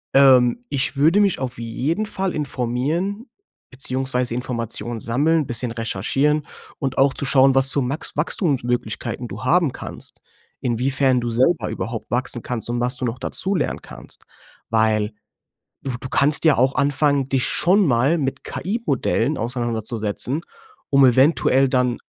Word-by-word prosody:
Ähm, 130 - +5
ich 135 0 -1
würde 160 +8 +4
mich 200 -3 +2
auf 130 -1 -4
jeden 130 - -2
Fall 190 -3 -3
informieren 150 - -2 0.4
beziehungsweise 125 -1 -2
Informationen 120 -1 -3
sammeln, 150 +9 +1
'n - - -11
bisschen 120 0 -1
recherchieren 135 +7 0 0.3
und 135 -2 -3
auch 135 0 +4
zu - - +2
schauen, 135 0 +4
was 135 0 +4
zu 140 - 0
Max 135 +5 -4
Wachstumsmöglichkeiten 125 - -1
du - - -8
haben 170 -5 +3
kannst, - - -7 0.4
inwiefern 130 +2 +1
du 120 -1 -3
selber 130 +9 +1
überhaupt 115 -1 -5
wachsen 120 -1 -1
kannst 120 -2 -4
und 120 0 -1
was 125 +1 +1
du 130 - -3
noch 120 +1 -3
dazu 190 +9 -2
lernen 155 - -2
kannst. - - -13 0.4
Weil, 110 -1 +2 0.7
du 135 - -3
du 130 - -7
kannst 145 +3 +2
ja 155 -4 +5
auch 130 +2 +3
anfangen, 140 0 +2
dich 135 -1 0
schon 195 +2 +3
mal 135 +5 +2
mit 135 -2 -3
KI-Modellen 155 - -1
auseinanderzusetzen, 120 +3 -2 0.5
um 140 -1 +6
eventuell 135 +1 +4
dann 125 -2 +1
130 Hz, 145 wpm, -21 LUFS, 120-145 Hz, 0.7 s, um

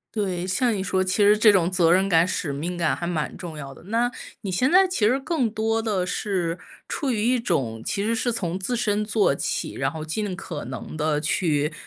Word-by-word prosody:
对， 185 -4 -1
像 230 +6 +1
你 200 - -2
说 190 -1 0
其 185 0 -1
实 210 +1 +6
这 215 0 +7
种 180 -4 +3
责 175 -3 +3
任 190 +2 +4
感、 165 -3 +4
使 170 -5 -2
命 170 +6 -4
感 170 -2 +1
还 170 - -5
蛮 170 -3 -2
重 170 -4 -8
要 140 -2 -7
的。 - - -16
那 230 +3 +1 0.3
你 200 - -3
现 250 - +1
在 375 +2 +6
其 370 - -3
实 250 +5 +3
更 270 -5 -1
多 225 +1 0
地 205 -5 0
是 180 -3 -2 0.3
出 280 -4 -2
于 220 -3 -1
一 245 +3 +3
种， 120 - -1
其 200 - -2
实 225 +3 0
是 245 +1 0
从 180 -6 -2
自 235 +6 -2
身 210 -2 +1
做 210 -8 +2
起， - - -3
然 135 0 -1
后 155 0 -6
尽 195 +5 -2
可 175 -4 -6
能 125 +4 -7
地 155 -1 0
去 150 -1 0
190 Hz, 245 characters per minute, -24 LUFS, 165-220 Hz, 0.3 s, 这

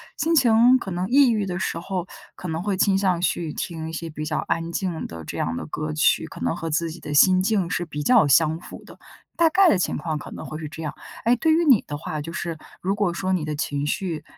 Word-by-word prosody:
心 330 +1 0
情 245 -3 +5
可 195 -6 -6
能 180 +3 -2
抑 275 +1 +6
郁 215 -3 0
的 180 -1 -3
时 190 - -2
候 180 +1 -4 0.3
可 180 - -7
能 160 +1 -3
会 200 -1 -1
倾 195 0 +3
向 190 -3 +1
去 170 -2 -1
听 160 0 -5
一 - - -6
些 165 0 -5
比 155 -1 -6
较 155 0 -2
安 165 0 -1
静 175 -2 -3
的 80 -1 -9
这 - - -6
样 80 +1 -1
的 - - -5
歌 155 0 -4
曲， 155 +1 +2
可 - - -11
能 - - -1
和 165 -1 -4
自 165 +2 0
己 160 +1 -9
的 150 - -5
心 185 +5 +6
境 195 -3 +1
是 175 -1 -1
比 150 -2 -5
较 245 0 +5
相 155 +3 +4
符 - - -11
的， - - -14 0.4
大 335 -1 +4
概 380 +4 +5
的 320 - +4
情 180 - -1
况 155 0 -3
可 - - -9
能 - - -8
会 155 - -6
是 155 -1 -6
这 160 +2 -8
样。 150 -1 -4 0.3
诶， 235 +2 +5
对 320 +6 +1
于 335 +2 +3
你 260 -9 +5
的 145 - -5
话， 155 0 -5
就 160 +3 -7
是 170 -2 -4 0.2
如 195 +2 -1
果 200 -4 0
说 185 +2 -1
你 180 -4 0
的 155 0 -3
情 145 -1 -2
绪， 165 +1 -3
170 Hz, 285 characters per minute, -23 LUFS, 155-200 Hz, 0.4 s, 抑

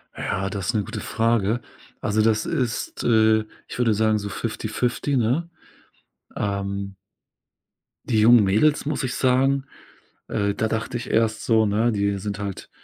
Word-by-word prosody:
Ja, 95 +1 -2
das 100 +1 -2
'ne 105 -2 +1
gute - - -6
Frage. 115 0 +1 0.4
Also, 105 +1 +1
das 110 0 +2
ist, 125 -9 -2
äh, 110 -1 +4 0.2
ich - - -8
würde 120 -3 +2
sagen, 110 0 +2
so 100 0 -5
fifty 95 - -4
fifty, 130 +3 -1
ne? 130 +9 0 0.9
Ähm. 100 -1 -3 1.1
Die 110 -3 +3
jungen 115 0 +7
Mädels, 110 +12 +2
muss 145 -1 -2
ich 130 - -2
sagen, 135 +1 +2 0.6
äh, 100 -2 0
da 110 - 0
dachte 115 +3 -3
ich 120 0 -4
erst 110 -1 +1
so, 110 -1 +3
ne, 110 +3 +2
die 100 -1 0
sind 100 +1 -4
halt 100 -2 -6
110 Hz, 155 wpm, -23 LUFS, 100-120 Hz, 1.1 s, jungen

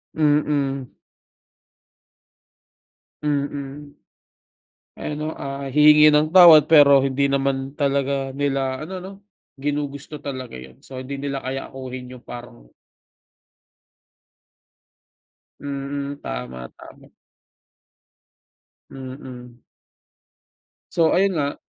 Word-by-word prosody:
Mm. 145 -4 0 2.3
Mm. 145 0 -3 1.1
Ano 150 +1 -4
ah, 140 0 -5
hihingi 150 +1 +7
ng 155 +4 +2
tawad 160 -5 +9
pero 145 -3 +7
hindi 135 +1 0
naman 135 -1 -1
talaga 140 -1 -1
nila 135 -1 -1
ano 185 +3 -6
no, 190 +2 -9 0.4
ginugusto 145 +1 -4
talaga 130 - -7
yun. 65 0 -15
So, 130 -1 -9
hindi 130 +2 -6
nila 140 0 -4
kayang 135 +1 -5
akuhin 130 -1 -8
yung 125 -1 -12
parang 120 - -10 2.9
Mm, 140 0 -5
tama, 60 +1 -6
tama. 135 0 -15 1.8
Mm. 130 -2 -10 1.3
So 165 -1 +2
ayun 195 +1 +3
nga 145 0 -1
140 Hz, 85 wpm, -22 LUFS, 130-145 Hz, 2.9 s, tawad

